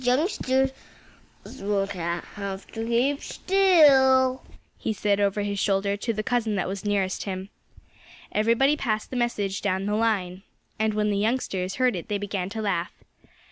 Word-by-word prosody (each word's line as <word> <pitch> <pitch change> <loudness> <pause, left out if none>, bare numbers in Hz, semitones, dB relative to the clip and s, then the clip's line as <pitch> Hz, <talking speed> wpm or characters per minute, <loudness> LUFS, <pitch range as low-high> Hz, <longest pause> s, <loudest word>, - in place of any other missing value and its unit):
"Those - - -3
youngsters 265 -2 +2 0.9
will 200 0 0
have 190 +2 -5
to 225 0 -4
keep 260 +5 +1
still," 270 -9 +4 0.4
he 220 - -1
said 205 -1 +1
over 205 0 +1
his 200 -1 -2
shoulder 200 0 +1
to 215 +3 -2
the 215 -1 -3
cousin 225 -2 0
that 190 - -1
was 195 +1 -5
nearest 200 -2 -1
him. 190 0 -5 0.8
Everybody 230 +7 +3
passed 215 -7 -2
the - - -4
message 210 -5 -1
down 190 -1 -1
the 205 - -1
line. 200 -5 0 0.4
And 220 -1 +1
when 210 0 +1
the 200 - 0
youngsters 200 -5 -1
heard 255 -3 +2
it 175 - -6
they 205 - -1
began 200 -2 -3
to 220 +1 -4
laugh. 175 -4 -1
210 Hz, 160 wpm, -25 LUFS, 195-245 Hz, 0.9 s, still